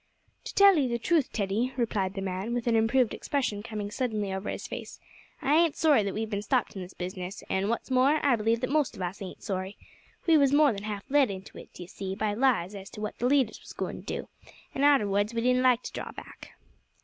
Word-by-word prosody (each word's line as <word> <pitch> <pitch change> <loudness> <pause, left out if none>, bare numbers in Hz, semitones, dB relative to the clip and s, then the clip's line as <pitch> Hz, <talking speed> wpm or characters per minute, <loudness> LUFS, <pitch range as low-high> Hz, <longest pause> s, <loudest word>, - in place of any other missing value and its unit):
"To - - -7
tell 395 -4 +7
'ee 270 - +2
the 235 -1 -1
truth, 300 +3 +1
Teddy," 220 +5 -1
replied 205 -5 -1
the 195 - -3
man, 195 +6 -2
an 235 -2 +2
improved 225 +1 +3
expression 255 -8 -2
coming 210 -2 -5
suddenly 215 -5 -2
over 190 +2 -4
his - - -5
face, - - -7 0.4
"I 280 - +2
ain't 330 -1 +4
sorry 300 -7 +4
that 200 -1 -3
we've 220 +1 -2
bin 205 -2 -3
stopped 245 +1 0
in 190 - -5
this 180 +1 -9
business, 185 +1 -6
and, 195 +2 0
wot's 235 +3 -3
more, 265 +4 +4
I 275 -4 +5
believe 225 +1 0
that 255 0 -2
most 300 -3 +1
of 185 - -5
us 180 +3 -5
ain't 190 - -8
sorry. 190 0 -4 0.5
We 325 -3 +5
was 280 -1 +3
more 290 -3 +5
than 200 0 -6
half 205 -2 -4
led 280 -3 +4
into 190 0 -8
it, - - -13
d'ee 180 - -9
see, 190 +1 -6
by 215 0 -1
lies 220 -6 +1
as 195 -1 -8
to - - -10
what 210 - -5
the 245 - +1
leaders 265 -4 +2
was - - -11
goin' - - -4
to - - -9 0.2
do, - - -16 0.5
an' 270 - -3
arterwards 210 -6 +3
we 230 - 0
didn't 250 +1 +3
like 250 -1 +3
to - - -6
draw - - -5
back." - - -12
225 Hz, 235 wpm, -28 LUFS, 200-260 Hz, 0.5 s, tell